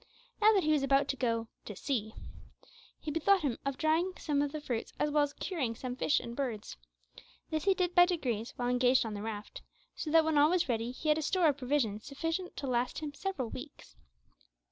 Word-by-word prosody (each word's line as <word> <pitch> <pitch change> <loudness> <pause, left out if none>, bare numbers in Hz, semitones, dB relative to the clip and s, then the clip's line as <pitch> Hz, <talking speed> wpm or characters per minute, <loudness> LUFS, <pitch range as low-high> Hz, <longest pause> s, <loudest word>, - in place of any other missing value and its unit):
Now 430 +1 +7
that 390 - +3
he 310 - +2
was 300 -2 +3
about 275 0 +3
to - - 0
"go 230 -3 -1 0.2
to 210 - -7
sea," 220 -3 -2 0.8
he 305 - -4
bethought 370 +5 +3
him 260 -6 -1
of 275 -1 -2
drying 325 +4 +1
some 290 -3 0
of 290 -1 -1
the 305 - -4
fruits 245 -6 -4
as 295 - 0
well 300 0 +3
as 290 0 0
curing 280 -13 -3
some 250 +1 -5
fish 290 - +2
and 235 - -7
birds. 240 -6 -4 0.8
This 315 0 -1
he 390 -1 +4
did 360 -2 0
by 355 0 +7
degrees, 250 - -2
while 245 0 -1
engaged 250 0 +3
on 220 - -4
the 205 - -5
raft, 215 -1 -6 0.3
so 310 - -4
that 325 0 +5
when 315 -2 +3
all 295 +1 +6
was 360 -1 +2
ready 230 -1 -1
he 280 +5 -4
had 300 +1 +4
a - - -2
store 340 +1 +3
of 285 - -1
provisions 245 -6 0
sufficient 325 +6 -4
to 280 - -4
last 245 -1 0
him 300 -2 -5
several 290 - -3
weeks. 280 +3 -10
285 Hz, 220 wpm, -32 LUFS, 245-315 Hz, 0.8 s, Now